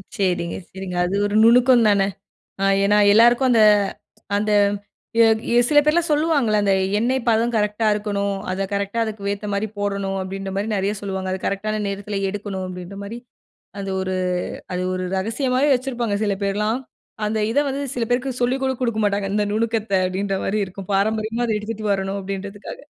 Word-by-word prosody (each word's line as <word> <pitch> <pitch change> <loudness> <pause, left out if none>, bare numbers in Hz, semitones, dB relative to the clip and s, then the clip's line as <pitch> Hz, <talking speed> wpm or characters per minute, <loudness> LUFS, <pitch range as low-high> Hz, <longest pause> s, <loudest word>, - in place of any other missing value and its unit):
சரிங்க, 175 -3 -1
சரிங்க. 190 -1 -6
அது 185 +2 -2
ஒரு 205 0 -1
நுணுக்கம் 240 +1 +6
தானே! 200 -2 +3 0.5
அ 195 - +1 0.2
ஏன்னா, 205 +1 +4
எல்லாருக்கும் 240 +4 +5
அந்த 225 -2 +5 0.7
அந்த 210 +1 0 1.2
சில 295 - +5
எ - - -3
பேர்லாம் 325 +3 +2
சொல்லுவாங்கல்ல 295 -8 +2
அந்த 200 -1 +2 0.3
எண்ணெய் 255 +4 +1
பதம் 230 +1 +2
கரெக்ட்டா 210 +1 0
இருக்கணும். 200 -1 -2 0.2
அதை 190 +1 -1
கரெக்ட்டா 200 +2 -2
அதுக்கு 205 -2 -4
ஏத்த 205 +1 -5
மாரி 200 +2 0
போடணும். 200 -1 -2
அப்படின்ற 195 +1 -5
மாரி 200 +2 -1
நிறைய 195 +1 0
சொல்லுவாங்க. 190 -2 -3
அது 190 - -2
கரெக்ட்டான 215 +2 -2
நேரத்தில 200 +1 -4
எடுக்கணும், 195 -2 -5
அப்படின்ற 180 +1 -8
மாரி. 225 +4 -6 0.6
அது 195 -1 -4
ஒரு 185 0 -2 0.6
அது 180 - -1
ஒரு 185 0 -3
ரகசியம் 230 +7 -1
மாதிரி 285 +2 +4
வச்சிருப்பாங்க, 245 -5 -2
சில 205 -1 +1
பேர்லாம். 210 +5 0 0.5
அந்த 220 +1 -1
இத 235 - +1
வந்து 275 +1 -3
சில 240 - -1
பேருக்கு 250 +1 -1
சொல்லி 250 +2 +2
கூட 265 - +1
கொடுக்க 235 -3 0
மாட்டாங்க. 200 -1 -1
இந்த 210 0 +1
நுணுக்கத்தை 220 -3 0
அப்படின்ற 195 +2 -2
மாரி 215 +2 0
இருக்கும், 185 +1 -10
பாரம்பரியமா 220 +3 0
அதை 220 -2 0
எடுத்துட்டு 215 0 -5
வரணும் 195 0 -2
அப்படின்றதுக்காக. 200 - -6
205 Hz, 170 wpm, -22 LUFS, 195-230 Hz, 1.2 s, நுணுக்கம்